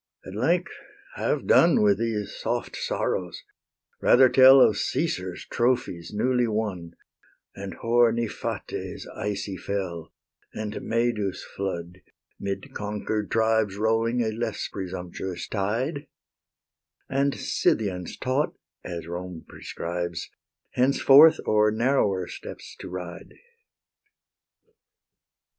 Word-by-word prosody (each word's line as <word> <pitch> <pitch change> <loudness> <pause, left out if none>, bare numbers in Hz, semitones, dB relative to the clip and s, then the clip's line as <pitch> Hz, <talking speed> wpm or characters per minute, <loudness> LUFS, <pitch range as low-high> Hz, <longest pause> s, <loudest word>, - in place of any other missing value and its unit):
At 95 - -8
length 165 - +1 0.4
have - - -1
done - - +5
With 100 -1 +4
these 110 -3 -2
soft - - -3
sorrows; 90 -2 -2 0.6
rather 130 0 +6
tell 130 +1 +8
Of 105 -5 +5
Caesar's 95 - -2
trophies 120 -9 -1
newly 125 +3 +1
won, 100 -6 -3 0.6
And 100 0 -7
hoar 120 0 +3
Niphates' 115 -1 -4
icy 100 -2 -3
fell, 90 -4 -4 0.4
And 110 0 -4
Medus' 115 -4 -1
flood, 90 -2 -5 0.4
'mid 100 -1 -5
conquer'd 105 0 -3
tribes 110 -3 +2
Rolling 115 +3 +1
a 110 - -1
less 110 -1 -3
presumptuous 90 -1 -5
tide, 120 +9 -2 1.0
And 140 +1 +1
Scythians 90 -5 -1
taught, 130 +4 -1 0.3
as 85 -2 -6
Rome 85 0 -6
prescribes, 85 0 -5 0.4
Henceforth 140 +4 +6
o'er 105 0 +4
narrower 110 -5 +1
steppes - - -9
to - - -8
ride. 90 -1 -8
105 Hz, 100 wpm, -26 LUFS, 95-120 Hz, 1.0 s, tell